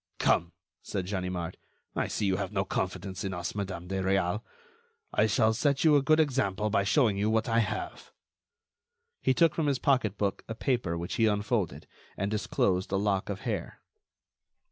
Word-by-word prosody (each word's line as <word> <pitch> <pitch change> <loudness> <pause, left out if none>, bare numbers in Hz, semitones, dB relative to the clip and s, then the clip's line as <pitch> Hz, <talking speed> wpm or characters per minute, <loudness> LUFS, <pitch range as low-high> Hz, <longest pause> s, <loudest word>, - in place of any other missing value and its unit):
"Come!" 85 +1 +2 0.3
said 95 -2 -3
Ganimard, 90 -3 -3 0.4
"I - - 0
see - - -2
you 95 -1 +2
have - - -3
no - - 0
confidence 95 0 -3
in 95 -2 -3
us, 85 0 -4
Madame 95 -4 -4
de 95 +1 -2
Réal. 95 +1 +1 0.7
I 110 - +3
shall 110 +1 +3
set 140 +4 +1
you 155 -2 +6
a 145 - +5
good 155 +3 +4
example 115 -9 +1
by 100 - +3
showing 105 0 +3
you 105 +2 +2
what 110 0 +1
I 115 0 +3
have." 110 - -3 1.1
He 130 - +2
took 165 +1 +4
from 160 -3 0
his 140 -2 +2
pocketbook 110 -8 +1
a 115 - -5
paper 115 -9 0
which 85 +1 -4
he 115 - +4
unfolded, 105 -2 -1 0.3
and 100 +2 -1
disclosed 95 -3 0
a - - +1
lock 100 -1 0
of 100 -1 -4
hair. 105 -8 -4
105 Hz, 175 wpm, -29 LUFS, 95-115 Hz, 1.1 s, you